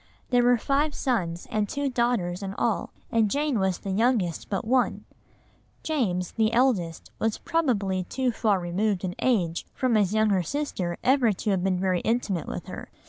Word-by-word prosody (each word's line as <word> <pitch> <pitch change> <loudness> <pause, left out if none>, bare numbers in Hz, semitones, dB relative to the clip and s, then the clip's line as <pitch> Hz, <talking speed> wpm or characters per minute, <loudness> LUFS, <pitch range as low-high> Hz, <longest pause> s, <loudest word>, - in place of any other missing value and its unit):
There 245 -1 +5
were 245 0 +5
five 285 +5 0
sons 175 -10 -1
and 210 -2 0
two 285 0 -1
daughters 235 -8 0
in 195 0 -5
all, 225 -3 0 0.2
and 225 -2 +3
Jane 285 -1 0
was 190 -2 +1
the 195 - -5
youngest 210 -5 +1
but 195 0 -2
one. 250 +2 +1 0.8
(See 315 - -2
Table, 210 -12 +1
p. - - -1
326.) 180 - -10
James, 220 -1 +2
the - - -9
eldest, 195 -11 +1
was 225 -1 0
probably 205 - 0
too 255 +5 -1
far 215 -4 +1
removed 185 +3 -1
in 180 -1 -2
age 180 -10 +1
from 255 -2 +1
his 205 -4 +3
younger 215 -3 +3
sister 185 - -3
ever 255 -3 +4
to 205 +2 -2
have 185 -2 0
been 185 -1 +1
very 185 -1 +1
intimate 220 -6 -1
with - - -5
her. - - -8
215 Hz, 195 wpm, -26 LUFS, 185-245 Hz, 0.8 s, There